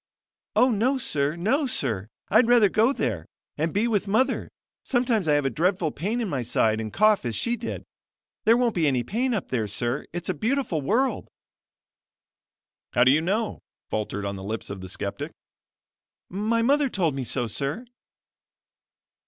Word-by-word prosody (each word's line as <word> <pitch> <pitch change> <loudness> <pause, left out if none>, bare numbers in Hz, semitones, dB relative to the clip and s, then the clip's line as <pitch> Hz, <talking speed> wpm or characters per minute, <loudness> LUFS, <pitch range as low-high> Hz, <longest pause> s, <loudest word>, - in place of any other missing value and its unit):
"Oh, 255 - +5
no, 240 +6 +2
sir! 150 - -1
no, 255 - +1
sir! 110 - -2 0.2
I'd 225 +3 +5
rather 235 -4 +6
go 225 +6 +3
there; 105 - -2 0.3
and 160 +2 -1
be 210 +6 +1
with 210 -3 0
mother. 255 +6 +1 0.3
Sometimes 240 - +1
I 150 - +4
have 145 -1 +2
a 135 - +1
dreadful 170 - +1
pain 205 +12 -2
in 230 - -1
my 140 -8 -2
side 110 -2 +1
and 110 -1 -5
cough 215 0 +3
as 120 -3 -2
she 235 - 0
did. - - -5 0.6
There 230 +2 +6
won't 245 -2 +2
be 165 -4 +1
any 130 -3 +1
pain 240 - -1
up 200 - -4
there, 115 -4 -1
sir; 120 +6 -2
it's 175 0 -5
a 185 - +1
beautiful 220 - -1
world!" 235 - 0 1.7
"How 125 - +5
do 130 - +6
you 150 +3 +4
know?" 210 +6 -1 0.3
faltered 105 -1 -2
on 100 0 -3
the 95 - -8
lips 110 +2 -4
of 100 -1 -6
the 95 - -7
skeptic. 100 +2 -4 1.0
"My 220 +5 0
mother 280 +2 +3
told 175 - 0
me 135 -1 -3
so, 125 +1 0
sir." 140 - -3
180 Hz, 175 wpm, -25 LUFS, -, 1.7 s, rather